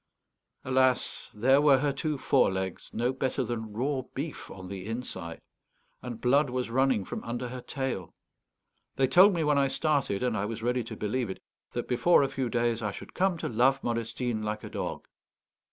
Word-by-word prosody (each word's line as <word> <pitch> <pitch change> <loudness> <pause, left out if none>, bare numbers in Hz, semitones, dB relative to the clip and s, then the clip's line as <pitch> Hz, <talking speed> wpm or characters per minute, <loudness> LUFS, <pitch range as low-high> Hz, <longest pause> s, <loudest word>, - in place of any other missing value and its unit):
Alas, 130 -1 +1
there 130 +6 +4
were 145 -2 +6
her 140 +1 0
two 150 +2 -2
forelegs 95 -9 +1
no 120 +3 0
better 130 0 -1
than 110 -2 -4
raw 130 +5 -1
beef 145 +3 -5
on 95 -1 -9
the 95 0 -6
inside, 95 -8 -5 0.6
and 120 -3 -6
blood 140 +3 +3
was 125 -1 -2
running 130 -5 +2
from - - -5
under 120 +1 -4
her 125 0 -6
tail. 130 - -4 0.8
They 135 - +3
told 180 +10 +7
me 165 - +1
when 150 -1 +3
I 140 - +3
started, 135 -7 0
and 125 -3 +1
I 100 - -1
was 115 +1 -5
ready 125 +1 +1
to 115 - -7
believe 115 +2 -1
it, 95 - -5 0.3
that 120 - -3
before 130 +6 +4
a 135 - 0
few 130 -3 -2
days 120 -1 0
I 105 - -1
should 100 - -9
come 185 -1 +1
to - - -3
love 130 +4 +3
Modestine 115 0 -2
like 105 0 -3
a - - -6
dog. - - -4
125 Hz, 185 wpm, -29 LUFS, 110-135 Hz, 0.8 s, told